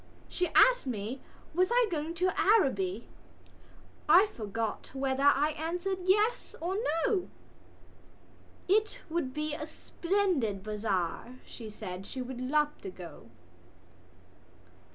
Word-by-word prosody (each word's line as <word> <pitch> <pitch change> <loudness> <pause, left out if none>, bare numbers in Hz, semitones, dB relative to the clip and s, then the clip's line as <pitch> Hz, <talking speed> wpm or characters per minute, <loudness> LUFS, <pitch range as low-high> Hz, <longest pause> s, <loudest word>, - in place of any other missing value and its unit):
She 360 - -1
asked - - +6
me 235 +2 -4 0.3
was 365 +3 +3
I 485 -1 +4
going 320 +1 -2
to 365 +2 +1
Araby. 235 - +2 1.0
I 355 +6 +8
forgot 225 - -4
whether 270 0 -1
I 285 +2 +4
answered 350 +5 -3
yes 420 +5 +2
or 355 +3 -2 0.3
no. 430 -7 0 1.4
It 425 +3 +2
would 320 -6 -1
be 300 +2 -3
a 300 0 -5
splendid 330 - -1
bazaar, 210 +1 -2
she 225 -3 -9
said; 195 -3 -7
she 265 - -6
would 255 0 -5
love 295 +3 +1
to - - -6
go. 175 -9 -11
295 Hz, 115 wpm, -30 LUFS, 225-365 Hz, 1.4 s, I